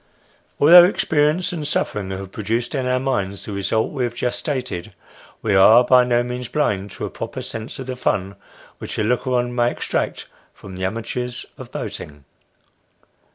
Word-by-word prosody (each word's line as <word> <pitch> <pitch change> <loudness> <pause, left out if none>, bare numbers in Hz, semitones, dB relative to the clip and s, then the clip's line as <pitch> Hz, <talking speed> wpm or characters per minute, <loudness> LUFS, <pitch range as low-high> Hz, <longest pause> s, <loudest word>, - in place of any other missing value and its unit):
Although 175 +4 +9
experience 160 -1 +1
and 155 -4 -4
suffering 100 -8 -2
have 95 0 -6
produced 115 +3 -2
in 130 -3 -1
our 125 0 +1
minds 100 -7 -2
the - - -6
result 100 +3 -1
we 135 -4 -2
have 120 -1 -2
just 120 0 -1
stated, 125 - -4 0.5
we 105 - +1
are 110 +5 +7
by 125 -1 +6
no 120 -1 +2
means 125 0 -5
blind 100 -9 -1
to - - -5
a - - -4
proper - - -6
sense 115 +5 -6
of 135 - -6
the 130 0 -4
fun 100 -5 -1 0.4
which - - -6
a - - +1
looker 125 +4 0
on 120 0 0
may 120 0 +2
extract - - -3 0.3
from 95 -1 -11
the 95 0 -3
amateurs 120 +4 -4
of - - -11
boating. 75 -1 -7
120 Hz, 175 wpm, -21 LUFS, 100-130 Hz, 0.5 s, Although